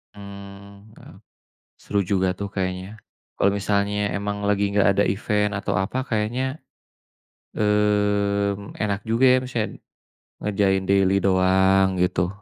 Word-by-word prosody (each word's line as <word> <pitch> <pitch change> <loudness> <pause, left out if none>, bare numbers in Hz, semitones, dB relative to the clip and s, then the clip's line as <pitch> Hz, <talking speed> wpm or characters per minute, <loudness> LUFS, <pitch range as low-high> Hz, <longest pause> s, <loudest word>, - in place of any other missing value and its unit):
Mmm. 100 +1 -12
Heeh, - - -15 0.7
seru 100 - -1
juga, 95 0 +1
tuh, 100 +1 -5
kayaknya, 95 +2 -4 0.4
kalau 100 - +3
misalnya 100 0 0
emang 100 0 -3
lagi 100 0 +1
nggak 100 -1 +3
ada 100 - +4
event 105 +1 0
atau 100 0 -3
apa 110 +8 -1
kayaknya, 125 +6 -2 1.0
mmm, 105 -1 0
enak 100 -2 -1
juga, 115 +3 +1
ya, 130 - +6
maksudnya 120 -4 -2 0.7
ngerjain 95 -2 +1
daily 95 0 +3
doang 95 0 +3
gitu. 90 -1 +1
100 Hz, 120 wpm, -23 LUFS, 95-105 Hz, 1.0 s, ya